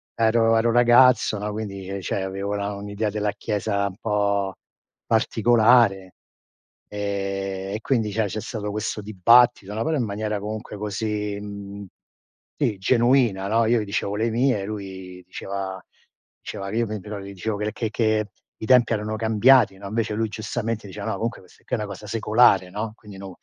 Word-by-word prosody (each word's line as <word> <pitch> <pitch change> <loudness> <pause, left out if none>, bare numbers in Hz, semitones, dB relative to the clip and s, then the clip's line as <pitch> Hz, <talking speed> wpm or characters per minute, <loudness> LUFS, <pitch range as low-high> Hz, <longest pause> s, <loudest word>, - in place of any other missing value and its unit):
ero 115 0 +3
ero 115 +1 +2
ragazzo, 120 -2 +5
no, 105 0 -3
quindi 100 -3 -6
ehm, 100 0 -4
cioè 95 +2 -2
avevo 100 +1 -3
la 100 0 -2
un'idea 100 +1 -3
della 105 -1 -1
chiesa 100 -1 -1
un 95 +1 -8
po' 100 -3 0 0.5
particolare. 110 -3 +3 0.8
Ehm, 100 -1 -3
e - - -3
quindi 110 -6 0
cioè 110 +1 0
c'è 110 +3 -4
stato 105 -3 -5
questo 105 0 -3
dibattito, 110 +1 +4
no, 110 - -2
però 160 -1 0
in 120 - 0
maniera 105 0 -3
comunque 105 0 -6
così, 105 0 -3
mhmm, 100 0 -8 0.7
sì 120 -9 0
genuina, 120 -3 +2
no. 115 +2 +2
Io 115 0 +3
gli - - -4
dicevo 100 0 -2
le 115 +1 +1
mie, 120 -4 +1
lui 95 -3 -7
diceva 95 0 -5 0.6
diceva 100 0 -6
che 110 - -5
io 115 - +2
pe 105 -1 -4
però 105 +2 -7
gli 100 0 -9
dicevo 100 +2 -3
che 105 - -3
l 105 - -2
che 115 - -3
che 110 -2 +1 0.3
i 110 - -5
tempi 120 -1 +5
erano 110 0 -2
cambiati, 110 -1 +4
no, 100 - -11
invece 110 +1 -1
lui 110 0 -1
giustamente 110 0 -4
diceva: 100 +2 -7
"No, 110 - -1
comunque 115 -2 -3
questa 90 - -22
qui - - -1
è - - -4
una 105 - -3
cosa 100 +1 -9
secolare, 105 -3 +3
no, 105 +2 -4
quindi 105 -4 -13
non 95 0 -8
105 Hz, 180 wpm, -23 LUFS, 100-115 Hz, 0.8 s, ragazzo